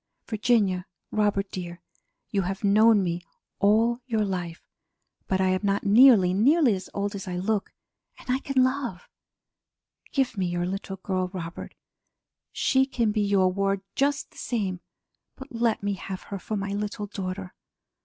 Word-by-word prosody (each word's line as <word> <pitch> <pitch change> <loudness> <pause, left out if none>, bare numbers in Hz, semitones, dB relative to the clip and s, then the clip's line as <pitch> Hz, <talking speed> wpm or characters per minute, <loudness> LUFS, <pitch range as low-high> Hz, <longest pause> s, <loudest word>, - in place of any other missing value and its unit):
Virginia, 210 -5 +1 0.2
Robert 205 -2 0
dear, 175 -1 -7 0.5
you 200 - +1
have 195 +3 -4
known 210 +1 +5
me 175 -1 -2 0.4
all 225 +4 +3
your 220 -4 +1
life 175 -4 -4 0.6
but 190 - 0
I 190 0 +3
am 185 0 +2
not 200 -1 0
nearly, 205 -4 +7
nearly 265 - +4
as 185 -1 -5
old 200 +1 -1
as 195 -2 -6
I 180 - -3
look, 200 +2 -1 0.5
and - - -16
I 255 +1 +1
can 270 -2 +2
love. 255 -8 -2 1.0
Give 265 -4 0
me 190 -3 -1
your 175 0 -1
little 195 +1 -4
girl, 185 -1 -2
Robert! 175 -2 -7 0.8
She 265 0 +2
can 235 -5 0
be 210 0 0
your 195 -2 +3
ward 195 0 0
just 280 0 0
the - - -14
same, 195 -7 -2 0.6
but 265 +1 -11
let 230 -3 0
me 205 0 0
have 190 -1 -6
her 200 - -6
for 215 +3 -4
my 200 0 -3
little 205 0 -3
daughter. 190 -2 -5
200 Hz, 160 wpm, -26 LUFS, 185-225 Hz, 1.0 s, nearly